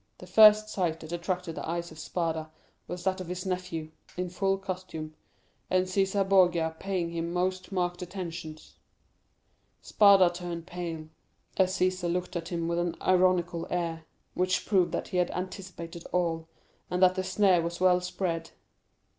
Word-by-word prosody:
The - - -11
first 215 +3 +7
sight 175 -6 -1
that 160 - -9
attracted 175 0 -3
the - - -5
eyes 170 0 -3
of 160 - -12
Spada 160 -1 -2 0.4
was 175 0 -6
that 190 0 0
of 185 - -7
his 180 +1 -5
nephew, 180 -4 -3 0.3
in 180 -1 -2
full 195 +1 +1
costume, 185 -5 -6 0.6
and 185 0 +3
Cæsar 195 +1 +1
Borgia 175 -4 +3
paying 185 -3 -2
him 170 0 -3
most 185 +2 -1
marked 175 -1 -1
attentions. 170 -4 -7 1.0
Spada 195 -4 +5
turned 175 -1 -6
pale, 165 -3 -6 0.5
as 190 -1 +3
Cæsar 185 -1 +1
looked 180 +1 -3
at 165 -1 -3
him 170 -2 -2
with 170 0 0
an 175 -1 -1
ironical 180 -2 +2
air, 165 -2 -2 0.3
which 185 0 0
proved 190 -4 +3
that - - -3
he 185 - -2
had 180 -1 +2
anticipated 180 -2 -6
all, 165 -2 0 0.4
and 180 +1 +1
that 185 0 +6
the 185 0 -2
snare 185 -1 +3
was 170 +1 -4
well 180 -1 +4
spread. 175 -2 -3
180 Hz, 160 wpm, -29 LUFS, 170-185 Hz, 1.0 s, first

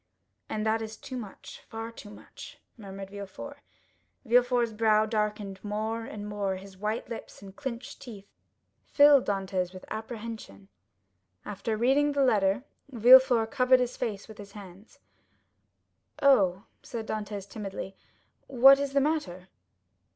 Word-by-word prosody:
"And 215 0 -2
that 220 +1 +1
was 220 0 -6
too 260 - -8
much, 200 -5 -9
far 225 +1 -6
too 220 -2 -12
much," 205 - -12 0.2
murmured 195 -3 -9
Villefort. 205 +8 -8 0.7
Villefort's 245 0 +3
brow 215 0 +3
darkened 210 -3 -3
more 220 +2 -3
and 210 -1 -7
more, 200 -2 -2
his 190 +1 -11
white 210 +4 -3
lips 230 -3 -9
and 195 -1 -12
clenched 255 +2 -7
teeth 210 -6 -10 0.6
filled 285 -2 +6
Dantès 190 -2 -2
with 185 - -10
apprehension. 220 - -7 0.8
After 210 +2 -3
reading 275 +5 +3
the 280 -1 +2
letter, 205 -1 +2 0.3
Villefort 245 -2 +6
covered 255 -1 +4
his 250 0 -1
face 210 -5 -4
with 220 -2 -13
his 200 -1 -11
hands. 195 0 -13 1.2
"Oh," 200 -10 +4 0.2
said 230 -3 -6
Dantès 205 -2 -5
timidly, 195 -2 -7 0.5
"what 270 +2 +7
is 280 -1 -2
the 280 - +3
matter?" 195 - -2
220 Hz, 135 wpm, -28 LUFS, 200-245 Hz, 1.2 s, what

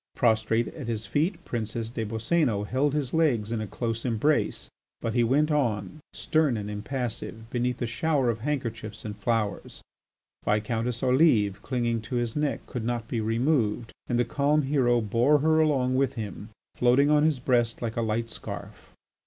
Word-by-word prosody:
Prostrate 115 -1 +2
at 145 -7 -8
his 110 -2 -3
feet, 165 - -1
Princess 115 0 -3
des 115 -2 -3
Boscénos 110 -1 0
held 140 +3 +1
his 140 -4 -2
legs 130 -10 +2
in 115 -2 -1
a 110 - -4
close 115 +1 -3
embrace, 130 +5 0 0.3
but 115 - -2
he 120 0 +3
went 145 +6 +2
on, 115 -5 0
stern 155 -7 +1
and 105 0 -4
impassive, 115 0 -4
beneath 125 0 -1
a - - +1
shower 135 +1 +1
of 115 - -6
handkerchiefs 115 -6 -4
and 105 -1 -5
flowers. 110 -2 -2 0.6
Viscountess 115 +3 -1
Olive, 125 - +3
clinging 120 -3 -1
to 115 +3 -5
his 120 -2 -1
neck, 150 -1 -1
could 125 -4 -5
not 120 -1 -2
be 115 -1 -2
removed, 115 0 0
and 120 - 0
the 120 - +2
calm 145 +1 +2
hero 130 -4 +2
bore 120 +7 +3
her 160 +2 +3
along 135 -5 +2
with 135 0 +1
him, 105 -2 -6 0.2
floating 130 +4 +4
on 150 0 +5
his 155 -3 +3
breast 120 -2 +1
like 115 -1 -3
a 115 - 0
light 115 +1 -1
scarf. - - -8
120 Hz, 170 wpm, -27 LUFS, 110-140 Hz, 0.6 s, on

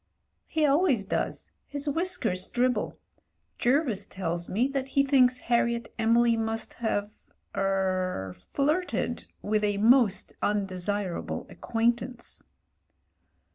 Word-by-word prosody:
"He 315 -2 +1
always 280 - +3
does. - - -3 0.2
His 285 +1 -4
whiskers 290 - +1
dribble. 245 -3 0 0.6
Jervis 240 -6 +1
tells 170 -2 -3
me 235 +7 +2
that 275 -1 -2
he 275 +1 +2
thinks 255 -2 +4
Harriet 235 -1 0
Emily 230 +1 +4
must 225 0 -2
have 205 -2 -1 0.3
— - - -21
er 185 - 0
— - - -26
flirted 305 +6 0 0.2
with 215 0 +1
a 205 -1 +1
most 225 -1 +4
undesirable 195 -2 -2
acquaintance." 235 +1 -2
230 Hz, 110 wpm, -28 LUFS, 200-265 Hz, 0.6 s, thinks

